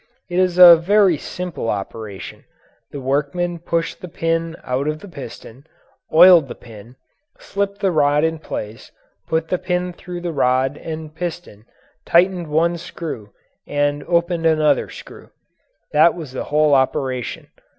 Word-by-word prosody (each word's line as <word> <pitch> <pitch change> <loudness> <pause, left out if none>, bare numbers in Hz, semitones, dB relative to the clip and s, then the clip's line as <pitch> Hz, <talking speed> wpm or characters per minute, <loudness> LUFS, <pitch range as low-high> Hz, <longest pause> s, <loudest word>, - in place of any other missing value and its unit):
It 175 - 0
is 180 -1 +1
a 175 -2 +10
very 195 +1 +3
simple 175 -4 -5
operation. 100 -1 -6 0.5
The 145 - -7
workman 145 +6 -1
pushed 165 0 -3
the 180 - -7
pin 165 0 -2
out 130 +3 -2
of 155 0 -1
the 205 - -12
piston, 135 - -11 0.4
oiled 170 -2 +7
the - - -8
pin, 115 +1 -14 0.4
slipped 200 0 -4
the 195 - +2
rod 150 -2 +2
in 160 0 0
place, 110 -5 -7 0.4
put 160 0 -1
the 180 - 0
pin 180 -1 -2
through 175 0 -8
the 170 -1 -4
rod 130 0 +1
and 155 -1 -7
piston, 165 -10 -7 0.4
tightened 175 0 +2
one 165 +3 +1
screw, 155 - -7 0.4
and 145 0 -1
opened 170 -1 +1
another 155 -1 +2
screw. - - -12 0.6
That 155 +2 +4
was 160 -6 -8
the 130 - -5
whole 150 0 +2
operation. 130 -2 -1
160 Hz, 145 wpm, -20 LUFS, 140-175 Hz, 0.6 s, a